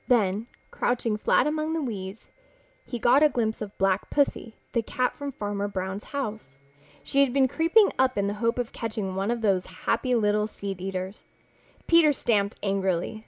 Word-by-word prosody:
Then, 215 -2 +2 0.2
crouching 235 -3 0
flat 215 - +3
among 310 +1 -1
the 325 - -1
weeds, 200 -4 -6 0.6
he 240 - -4
got 245 +4 +4
a 305 - +6
glimpse 225 -5 -1
of 210 -1 -7
Black 195 -1 +1
Pussy, 280 -5 0 0.2
the 235 - +1
cat 250 +3 -1
from 285 -1 -5
Farmer 205 -4 -3
Brown's 190 0 -4
house. 215 - -5 0.5
She 275 - 0
had 275 -3 +3
been 265 0 +3
creeping 335 - +4
up 260 -2 +3
in 200 - +1
the 200 - -1
hope 230 +1 +1
of 245 -2 -3
catching 215 -4 -3
one 195 +3 -1
of 240 -1 -1
those 195 -4 +1 0.2
happy 255 -1 +1
little 210 -1 +2
seedeaters. 195 -1 -5 0.6
Peter 335 -3 +5
stamped 205 -6 +1
angrily. 195 0 -1
220 Hz, 170 wpm, -26 LUFS, 200-255 Hz, 0.6 s, a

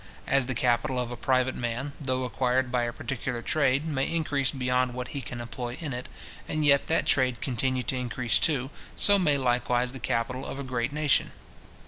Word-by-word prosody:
As 135 -2 +3
the 130 - -2
capital 120 +2 +1
of 125 -1 -3
a - - -4
private 130 +1 +1
man, 125 +4 -3
though 130 -2 0
acquired 125 0 0
by 120 -1 +1
a 120 - -2
particular 120 0 -4
trade, 140 0 +1
may 140 -4 0
increase 145 -5 +1
beyond 125 -2 0
what 125 0 -5
he 140 - -4
can 120 -2 -7
employ 120 +1 -5
in 150 -6 -4
it, 125 +1 -6 0.4
and 155 0 -1
yet 140 -1 +5
that 165 - +1
trade 130 -3 +2
continue 130 0 -1
to 130 - -1
increase 125 -2 +1
too, 135 -3 +1 0.2
so 200 -1 +5
may 150 -6 +3
likewise 125 -1 +1
the 135 - -8
capital 120 +3 -2
of 135 - -6
a - - -4
great 125 -1 -2
nation. 145 -2 +1
130 Hz, 195 wpm, -27 LUFS, 125-140 Hz, 0.4 s, yet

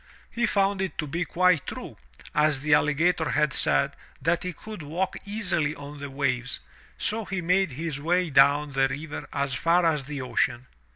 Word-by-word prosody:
He 235 0 0
found 195 -1 +1
it 190 -6 -3
to 155 - -1
be 170 +5 -2
quite 180 -3 +2
tme, - - -7 0.4
as 150 -2 +2
the 150 0 +2
alligator 160 +2 +2
had 150 0 +1
said, - - +2 0.2
that 165 +4 +1
he 180 - -3
could 215 +2 -9
walk 165 +6 -2
easily 180 -8 0
on 145 0 -9
the 140 0 -6
waves, 135 -2 -1 0.4
so 220 +1 +1
he 195 -1 -3
made 180 -2 +1
his 150 0 -4
way 175 +1 +1
down 140 +2 +4
the 135 0 +2
river 145 +3 -6
as 140 -1 -1
far 170 +6 +2
as 150 -4 +1
the 145 0 -5
ocean. 125 -1 0
155 Hz, 180 wpm, -26 LUFS, 140-180 Hz, 0.4 s, down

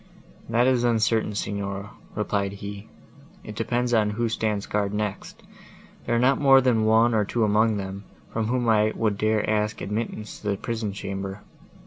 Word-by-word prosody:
"That 120 +2 +3
is 130 -2 +3
uncertain, 115 -2 +1
Signora," 100 0 -4 0.2
replied 100 -2 -1
he. 100 +1 -8 0.6
"It 110 - -8
depends 120 +2 -1
upon 110 -2 +3
who 115 +2 -1
stands 105 -2 -1
guard 105 -1 -1
next: 105 -1 -4 0.6
there 120 - +1
are - - +3
not 135 +3 +3
more 135 -1 +7
than 120 -4 +2
one 115 +2 +4
or 110 -1 +3
two 115 +3 -1
among 110 +1 +3
them, 100 0 -6 0.3
from 110 -1 -1
whom 120 0 0
I 110 -1 +3
would 110 -2 0
dare 110 +1 +1
to - - -4
ask 105 0 0
admittance 105 +1 -4
to 105 - -4
the 100 - 0
prison 110 -2 -3
chamber." 100 0 -5
110 Hz, 175 wpm, -25 LUFS, 100-115 Hz, 0.6 s, more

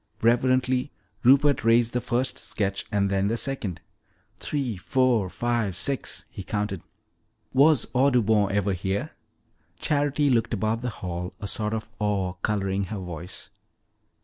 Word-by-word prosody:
Reverently 130 +3 +2 0.3
Rupert 140 +1 +5
raised 115 +1 +4
the 125 - 0
first 125 +1 -1
sketch 100 -1 -2
and 100 -2 +1
then 100 0 +1
the 115 +3 0
second. 110 -11 -2 0.6
"Three, 135 -7 -2
four, 120 0 +1
five, 115 -4 -1
six," 135 +8 -2
he - - -7
counted. 105 -2 -3 0.7
"Was 140 -1 +5
Audubon 115 -6 +3
ever 100 0 +1
here?" 95 +2 -2 0.7
Charity 145 - +1
looked 115 -1 +1
about 110 +2 -1
the 125 - -2
hall, 90 -4 -5
a - - -6
sort 105 +2 -1
of 110 0 -6
awe 100 -3 0
coloring 100 -1 0
her 105 +3 -5
voice. 90 -2 -7
110 Hz, 135 wpm, -26 LUFS, 100-125 Hz, 0.7 s, Rupert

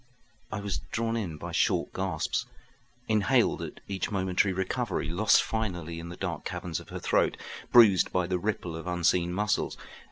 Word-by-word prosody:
I 110 - -3
was 100 -7 -2
drawn 115 0 -1
in 90 -9 -3
by - - -6
short - - +1
gasps, 95 -5 -1 0.6
inhaled 105 -3 +3
at - - -7
each 95 -1 -2
momentary 95 0 +1
recovery, 95 0 -2
lost 100 +5 +4
finally 90 -7 -3
in 85 +1 -7
the 85 - -8
dark 85 -5 -3
caverns 85 -3 -4
of - - -13
her - - -5
throat, - - +2 0.3
bruised 110 -6 +7
by 90 -1 +1
the 90 0 -1
ripple 90 -4 -2
of 80 +2 -7
unseen 90 0 +2
muscles. 105 +3 0
95 Hz, 165 wpm, -28 LUFS, 85-105 Hz, 0.6 s, bruised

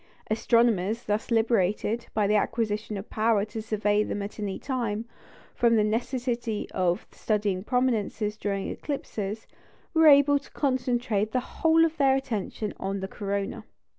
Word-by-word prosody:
Astronomers, 225 -1 +2
thus 210 +1 -2
liberated, 225 0 +1
by 210 -1 +2
the 205 - +2
acquisition 215 -1 0
of 195 - -8
power 215 -2 +2
to 220 +1 -6
survey 210 -1 +1
them 205 -1 -3
at 205 +2 -7
any 200 -2 -3
time, 235 -5 -2 0.5
from 235 -1 +3
the 215 - +4
necessity 235 0 -2
of 180 -1 0
studying 205 -4 -1
prominences 225 -4 0
during 200 -2 -2
eclipses, 220 -7 -4 0.5
were 320 -1 +6
able 285 0 +7
to - - -18
concentrate 245 -6 0
the 255 - +3
whole 325 +5 +3
of 325 0 -3
their 270 -2 +4
attention 220 -5 -3
on 195 +1 -2
the 190 - -3
corona. 200 0 -3
220 Hz, 145 wpm, -27 LUFS, 205-245 Hz, 0.5 s, able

